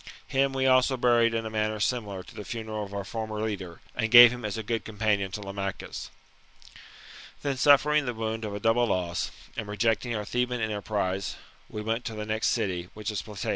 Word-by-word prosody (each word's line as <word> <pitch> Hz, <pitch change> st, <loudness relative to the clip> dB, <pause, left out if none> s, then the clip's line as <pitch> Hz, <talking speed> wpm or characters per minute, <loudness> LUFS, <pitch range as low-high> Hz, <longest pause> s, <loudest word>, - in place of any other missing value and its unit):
Him 135 Hz, +1 st, +1 dB
we 135 Hz, 0 st, 0 dB
also 130 Hz, 0 st, +4 dB
buried 120 Hz, -2 st, +3 dB
in 115 Hz, 0 st, -1 dB
a 110 Hz, -, -4 dB
manner 110 Hz, 0 st, -1 dB
similar 105 Hz, -4 st, -1 dB
to -, -, -14 dB
the 105 Hz, -, -7 dB
funeral 110 Hz, -1 st, -4 dB
of 100 Hz, -, -9 dB
our 100 Hz, 0 st, -4 dB
former 110 Hz, +1 st, -4 dB
leader, 100 Hz, -6 st, -4 dB
and 110 Hz, -, 0 dB
gave 120 Hz, 0 st, +11 dB
him 125 Hz, -1 st, -7 dB
as 105 Hz, 0 st, -3 dB
a 110 Hz, -, -3 dB
good 115 Hz, +1 st, -2 dB
companion 105 Hz, -3 st, 0 dB
to 105 Hz, -, -4 dB
Lamachus. 100 Hz, -1 st, -5 dB, 0.6 s
" -, -, -17 dB
Then, 140 Hz, -2 st, 0 dB
suffering 145 Hz, +1 st, +4 dB
the 120 Hz, -, -2 dB
wound 110 Hz, 0 st, -3 dB
of 105 Hz, -2 st, -4 dB
a -, -, -4 dB
double 115 Hz, +3 st, +3 dB
loss, 90 Hz, -4 st, -1 dB, 0.3 s
and 110 Hz, -, -4 dB
rejecting 115 Hz, +3 st, 0 dB
our 105 Hz, -1 st, -3 dB
Theban 125 Hz, +2 st, -1 dB
enterprise, 100 Hz, -3 st, -2 dB, 0.3 s
we 105 Hz, -, -5 dB
went 115 Hz, +2 st, -1 dB
to 115 Hz, -, -4 dB
the 105 Hz, 0 st, -4 dB
next 110 Hz, +1 st, 0 dB
city, 90 Hz, -6 st, -1 dB
which 105 Hz, 0 st, -3 dB
is 105 Hz, -, -2 dB
Platea. 105 Hz, -3 st, -6 dB
110 Hz, 210 wpm, -27 LUFS, 105-120 Hz, 0.6 s, gave